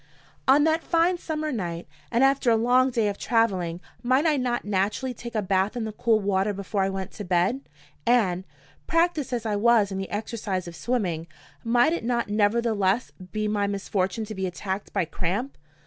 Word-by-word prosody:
On 280 Hz, +3 st, +6 dB
that 320 Hz, +1 st, +2 dB
fine 345 Hz, +2 st, +2 dB
summer 310 Hz, -2 st, -3 dB
night, 175 Hz, -8 st, -4 dB, 0.2 s
and 240 Hz, +2 st, +3 dB
after 270 Hz, -2 st, +3 dB
a 230 Hz, -, +5 dB
long 250 Hz, +3 st, +4 dB
day 230 Hz, -4 st, +1 dB
of 200 Hz, -1 st, -3 dB
traveling, 190 Hz, -7 st, +1 dB, 0.2 s
might 260 Hz, +5 st, +2 dB
I 310 Hz, -2 st, +4 dB
not 250 Hz, -3 st, -1 dB
naturally 210 Hz, +6 st, 0 dB
take 235 Hz, 0 st, -9 dB
a 215 Hz, -, +1 dB
bath 190 Hz, +3 st, +1 dB
in 235 Hz, -, -2 dB
the 220 Hz, -, -4 dB
cool 220 Hz, +1 st, +2 dB
water 200 Hz, 0 st, +1 dB
before 200 Hz, +1 st, -2 dB
I 190 Hz, -, +2 dB
went 190 Hz, -1 st, -4 dB
to 210 Hz, -, -7 dB
bed? 185 Hz, +8 st, +1 dB, 0.4 s
And, 205 Hz, -7 st, +2 dB, 0.4 s
practiced 330 Hz, -5 st, +1 dB
as 235 Hz, -2 st, -2 dB
I 210 Hz, -2 st, 0 dB
was 220 Hz, -2 st, +4 dB
in 190 Hz, -, -3 dB
the 190 Hz, -, -4 dB
exercise 205 Hz, -4 st, -3 dB
of 170 Hz, -, -8 dB
swimming, 175 Hz, -4 st, -2 dB, 0.4 s
might 240 Hz, +7 st, +3 dB
it 340 Hz, -, -3 dB
not 235 Hz, -2 st, 0 dB
nevertheless 210 Hz, 0 st, +1 dB, 0.2 s
be 215 Hz, 0 st, -1 dB
my 205 Hz, -1 st, 0 dB
misfortune 200 Hz, +1 st, -1 dB
to 215 Hz, -, -7 dB
be 190 Hz, -2 st, -2 dB
attacked 190 Hz, +3 st, -4 dB
by 175 Hz, -, 0 dB
cramp? 190 Hz, -, -3 dB
215 Hz, 190 wpm, -25 LUFS, 195-245 Hz, 0.4 s, On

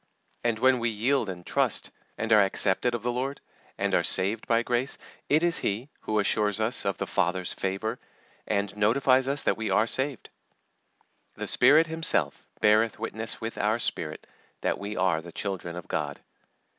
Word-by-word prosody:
And 120 Hz, -2 st, +1 dB
when 130 Hz, +2 st, +3 dB
we 120 Hz, 0 st, 0 dB
yield 115 Hz, +2 st, 0 dB
and 90 Hz, -2 st, -7 dB
trust, -, -, 0 dB, 0.3 s
and 110 Hz, 0 st, +1 dB
are 105 Hz, -1 st, +7 dB
accepted 100 Hz, +4 st, +2 dB
of 115 Hz, -, -5 dB
the 120 Hz, -, 0 dB
Lord, 130 Hz, +3 st, -3 dB, 0.4 s
and -, -, -1 dB
are -, -, +4 dB
saved 100 Hz, +4 st, +1 dB
by 115 Hz, 0 st, +2 dB
grace, 120 Hz, +2 st, -1 dB, 0.3 s
it 155 Hz, +3 st, +3 dB
is 170 Hz, -1 st, +3 dB
He 110 Hz, +8 st, -2 dB
who 110 Hz, -, -2 dB
assures 105 Hz, 0 st, +1 dB
us 110 Hz, +4 st, +1 dB
of 100 Hz, -, -1 dB
the -, -, -3 dB
Father's 90 Hz, -1 st, -1 dB
favour, 105 Hz, +5 st, -3 dB, 0.5 s
and 100 Hz, -1 st, -1 dB
notifies 130 Hz, +5 st, +3 dB
us 140 Hz, +1 st, +1 dB
that -, -, +1 dB
we 110 Hz, -1 st, -3 dB
are 110 Hz, -, +3 dB
saved. 130 Hz, +2 st, -2 dB, 1.0 s
"The -, -, -5 dB
Spirit 145 Hz, +6 st, +5 dB
Himself 160 Hz, 0 st, +1 dB
beareth 110 Hz, +1 st, +3 dB
witness 110 Hz, 0 st, -3 dB
with 115 Hz, 0 st, -5 dB
our 105 Hz, +2 st, +1 dB
spirit 80 Hz, -9 st, -2 dB, 0.4 s
that -, -, -1 dB
we 100 Hz, +1 st, -5 dB
are 90 Hz, -3 st, +1 dB
the 85 Hz, +1 st, -11 dB
children 95 Hz, -3 st, -4 dB
of 90 Hz, -, -8 dB
God." 75 Hz, -2 st, -3 dB
110 Hz, 175 wpm, -27 LUFS, 100-125 Hz, 1.0 s, are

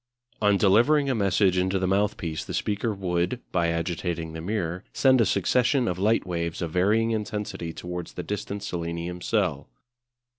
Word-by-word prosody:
On 105 Hz, -1 st, +4 dB
delivering 125 Hz, +9 st, +4 dB
a -, -, +2 dB
message 100 Hz, -3 st, +2 dB
into 95 Hz, +1 st, +1 dB
the 95 Hz, -, 0 dB
mouthpiece 95 Hz, -5 st, 0 dB
the -, -, -5 dB
speaker 105 Hz, +2 st, -1 dB
would, 90 Hz, +2 st, -1 dB
by 85 Hz, -2 st, +1 dB
agitating 85 Hz, -1 st, -2 dB
the 80 Hz, -, -6 dB
mirror, 90 Hz, -2 st, -2 dB
send 130 Hz, -2 st, +4 dB
a 110 Hz, -, +3 dB
succession 125 Hz, +7 st, +2 dB
of 90 Hz, -2 st, -2 dB
light 110 Hz, +2 st, +2 dB
waves 85 Hz, -2 st, -3 dB
of 85 Hz, -, -3 dB
varying 105 Hz, +6 st, +2 dB
intensity 105 Hz, -6 st, -3 dB
towards 90 Hz, +1 st, -6 dB
the 90 Hz, -, -5 dB
distant 100 Hz, 0 st, -4 dB
selenium 85 Hz, 0 st, -4 dB
cell. 90 Hz, -10 st, 0 dB
95 Hz, 160 wpm, -26 LUFS, 85-105 Hz, -, On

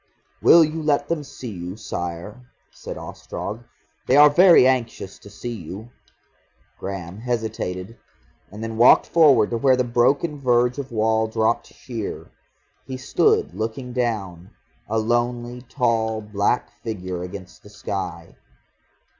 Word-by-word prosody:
"Will 170 Hz, 0 st, +8 dB
you 160 Hz, +1 st, -2 dB
let 145 Hz, -1 st, +1 dB
them 165 Hz, -3 st, -1 dB
see 125 Hz, -3 st, -8 dB
you, 90 Hz, +1 st, -7 dB
Sire?" 90 Hz, +5 st, -6 dB, 0.2 s
said -, -, -8 dB
Ostrog. 110 Hz, +4 st, -7 dB, 0.4 s
"They 130 Hz, -, +4 dB
are 150 Hz, 0 st, +8 dB
very 175 Hz, -3 st, +7 dB
anxious 120 Hz, -6 st, -1 dB
to 100 Hz, -, -14 dB
see 120 Hz, +4 st, -6 dB
you." 105 Hz, +4 st, -9 dB, 0.9 s
Graham 95 Hz, -1 st, -6 dB
hesitated, 110 Hz, -4 st, -4 dB, 0.5 s
and 105 Hz, +3 st, -8 dB
then 115 Hz, 0 st, -5 dB
walked 120 Hz, +2 st, +6 dB
forward 140 Hz, -10 st, +4 dB
to 115 Hz, -, 0 dB
where 130 Hz, +1 st, +4 dB
the 125 Hz, -, +1 dB
broken 140 Hz, +5 st, +1 dB
verge 125 Hz, 0 st, +2 dB
of 135 Hz, -2 st, -6 dB
wall 110 Hz, 0 st, +1 dB
dropped 110 Hz, +1 st, 0 dB
sheer. 115 Hz, -5 st, -7 dB, 0.6 s
He 130 Hz, -1 st, -5 dB
stood 130 Hz, -, +1 dB
looking 115 Hz, +5 st, -4 dB
down, 100 Hz, -8 st, -3 dB, 0.4 s
a 110 Hz, -, 0 dB
lonely, 120 Hz, +2 st, -1 dB
tall, 115 Hz, -4 st, 0 dB
black 105 Hz, +2 st, -1 dB
figure 95 Hz, -5 st, -5 dB
against 90 Hz, +1 st, -9 dB
the 105 Hz, -, -15 dB
sky. 90 Hz, -5 st, -5 dB
115 Hz, 135 wpm, -22 LUFS, 100-125 Hz, 0.9 s, Will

